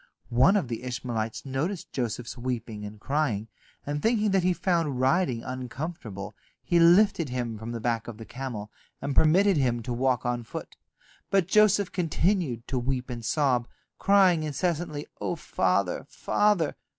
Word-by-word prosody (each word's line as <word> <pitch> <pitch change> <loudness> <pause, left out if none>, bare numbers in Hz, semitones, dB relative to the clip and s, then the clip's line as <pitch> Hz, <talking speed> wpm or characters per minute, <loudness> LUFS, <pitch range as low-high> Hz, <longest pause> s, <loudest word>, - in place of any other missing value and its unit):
One 130 - +5
of 185 - -1
the 115 -1 -4
Ishmaelites 120 -3 -3
noticed 150 +8 -3
Joseph's 120 -1 -3
weeping 120 -4 -4
and 105 +1 -9
crying, 115 -5 -1 0.4
and 145 +1 -2
thinking 220 -2 +2
that 190 -1 +3
he 180 +1 +2
found 165 -7 0
riding 130 -2 +2
uncomfortable, 130 - -6 0.3
he 170 - +2
lifted 170 -2 +5
him 120 -2 -3
from 110 +2 -6
the 120 - -4
back 115 0 -1
of 115 -3 -7
the 115 - -9
camel, 120 -5 -6 0.3
and 140 0 -3
permitted 185 +4 +5
him 120 -4 +1
to 120 - -3
walk 125 0 +1
on 120 0 0
foot. 110 - -8 0.5
But 195 -4 +2
Joseph 205 -1 +4
continued 165 - 0
to 130 - 0
weep 125 0 -2
and 120 -1 -6
sob, 125 -1 +1 0.3
crying 190 -4 +5
incessantly, 155 0 -2 0.2
"O - - -1
father, - - 0
father!" 205 -8 +1
135 Hz, 155 wpm, -27 LUFS, 120-175 Hz, 0.5 s, One